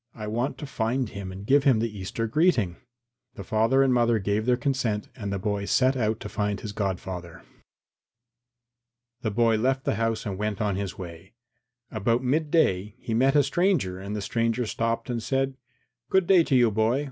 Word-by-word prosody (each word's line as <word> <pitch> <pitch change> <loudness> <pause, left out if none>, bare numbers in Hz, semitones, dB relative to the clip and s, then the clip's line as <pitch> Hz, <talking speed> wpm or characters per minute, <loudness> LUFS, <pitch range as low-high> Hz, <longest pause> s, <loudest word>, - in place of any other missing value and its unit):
I 110 - -6
want 120 +6 -2
to 150 - -6
find 125 -2 -1
him 100 -2 -7
and 95 +2 -8
give 140 +4 +4
him 135 -5 +4
the 110 -1 -2
Easter 100 +4 -3
greeting." 115 - +2 0.6
The 100 - -7
father 115 +6 +3
and 130 -2 +3
mother 120 -1 +3
gave 105 +2 -1
their 125 -1 +3
consent 125 -6 -1
and 105 -5 -5
the 100 - -1
boy 100 0 -2
set 130 +5 +3
out 110 -3 0
to - - -5
find 105 -1 -2
his 105 - -6
godfather. 95 -4 -4
III - - -24 1.8
The 110 - -1
boy 115 +1 +2
left 130 +4 0
the - - -1
house 115 +1 -1
and 100 -2 -4
set 105 0 0
out 100 - -8
on 105 -2 0
his 95 -2 -4
way. 85 0 -9 0.6
About 115 +3 0
midday 130 - +1
he 115 - -5
met 135 +5 +3
a 145 - +6
stranger 140 - +1
and 100 +2 -5
the 105 - -3
stranger 115 +3 0
stopped 115 +1 -2
and 120 -2 -2
said, 135 +2 -1 0.5
"Good 190 -1 +3
day 180 -1 +6
to 135 - +1
you, 120 -3 +5
boy. 110 +5 +2
115 Hz, 195 wpm, -26 LUFS, 100-130 Hz, 1.8 s, a